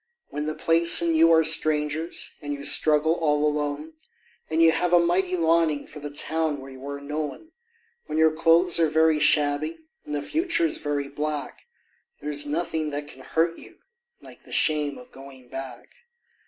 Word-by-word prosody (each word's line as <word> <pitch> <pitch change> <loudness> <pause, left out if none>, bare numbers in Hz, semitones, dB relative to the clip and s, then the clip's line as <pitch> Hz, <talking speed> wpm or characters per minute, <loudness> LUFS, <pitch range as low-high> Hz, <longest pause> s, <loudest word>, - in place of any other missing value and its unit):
When 150 +1 -5
the 155 - -3
place 165 +1 +5
and 165 -1 +1
you 165 +1 +5
are 160 0 +5
strangers 155 0 0
and 145 -1 -4
you 140 - -10
struggle 155 +1 +3
all 150 -3 0
alone, 150 +1 -3 0.6
And 160 +1 -1
you 165 - +6
have 180 +1 -1
a 175 - +7
mighty 180 +2 0
longing 165 -3 +1
for 150 - -12
the 145 0 -7
town 155 +1 -2
where 135 0 -11
you 130 0 -13
are 140 0 -6
known; 150 - -6 0.6
When - - -4
your 160 0 +4
clothes 165 +2 +3
are 160 -2 +3
very 160 0 +2
shabby 150 +1 +2 0.3
and 150 - -6
the 145 - -3
future's 330 - -1
very 145 -1 -3
black, 150 0 -5 0.5
There 150 - -5
is 145 0 -1
nothing 160 0 -3
that 145 0 -6
can 130 - -14
hurt 165 +5 -1
you - - -16 0.4
like - - -16
the - - -17
shame 150 -2 +1
of 250 0 -15
going 135 - -14
back. 130 -2 -8
155 Hz, 180 wpm, -24 LUFS, 145-165 Hz, 0.6 s, a